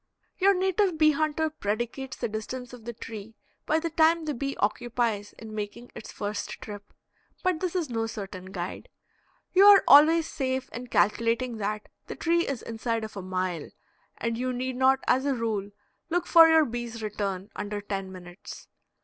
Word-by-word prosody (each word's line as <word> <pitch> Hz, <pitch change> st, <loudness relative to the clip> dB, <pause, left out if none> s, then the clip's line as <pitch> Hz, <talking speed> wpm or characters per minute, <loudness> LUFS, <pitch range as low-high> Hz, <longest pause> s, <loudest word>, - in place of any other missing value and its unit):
Your 395 Hz, +1 st, +5 dB
native 375 Hz, -1 st, +1 dB
bee 310 Hz, -1 st, +6 dB
hunter 310 Hz, +1 st, 0 dB
predicates 240 Hz, +1 st, -3 dB
the 240 Hz, -, -2 dB
distance 235 Hz, +3 st, -6 dB
of 235 Hz, -3 st, -11 dB
the 235 Hz, -, -5 dB
tree 220 Hz, -1 st, -9 dB, 0.3 s
by 315 Hz, -, +3 dB
the 335 Hz, 0 st, -3 dB
time 325 Hz, +1 st, +3 dB
the 300 Hz, -, -1 dB
bee 275 Hz, +2 st, -3 dB
occupies 220 Hz, -1 st, -1 dB
in 220 Hz, -1 st, -10 dB
making 215 Hz, +3 st, -6 dB
its -, -, -9 dB
first 205 Hz, 0 st, -4 dB
trip. 205 Hz, -1 st, -9 dB, 0.5 s
But 365 Hz, -3 st, +1 dB
this 365 Hz, 0 st, -2 dB
is 330 Hz, -8 st, -1 dB
no 225 Hz, -1 st, -1 dB
certain 195 Hz, -4 st, -7 dB
guide. 185 Hz, -1 st, -6 dB, 0.6 s
You 380 Hz, +2 st, +7 dB
are 410 Hz, -1 st, +9 dB
always 315 Hz, +3 st, +7 dB
safe 260 Hz, -3 st, -2 dB
in 245 Hz, +1 st, -7 dB
calculating 230 Hz, +2 st, +1 dB
that 210 Hz, 0 st, -3 dB, 0.2 s
the -, -, -6 dB
tree 340 Hz, 0 st, +1 dB
is 270 Hz, -5 st, -3 dB
inside 230 Hz, 0 st, -2 dB
of 215 Hz, -, -7 dB
a 195 Hz, -, -5 dB
mile, 185 Hz, -3 st, -3 dB, 0.5 s
and 230 Hz, 0 st, -2 dB
you 255 Hz, 0 st, -1 dB
need 255 Hz, +1 st, -3 dB
not 265 Hz, +1 st, +3 dB
as 260 Hz, +1 st, +3 dB
a 280 Hz, -1 st, +1 dB
rule 220 Hz, -4 st, -2 dB, 0.4 s
look 350 Hz, +1 st, 0 dB
for 330 Hz, -2 st, +8 dB
your 320 Hz, -1 st, +6 dB
bee's 235 Hz, -2 st, -5 dB
return 200 Hz, -1 st, -3 dB
under 205 Hz, 0 st, -4 dB
ten 195 Hz, -2 st, -4 dB
minutes. 180 Hz, 0 st, -11 dB
240 Hz, 175 wpm, -27 LUFS, 210-305 Hz, 0.6 s, are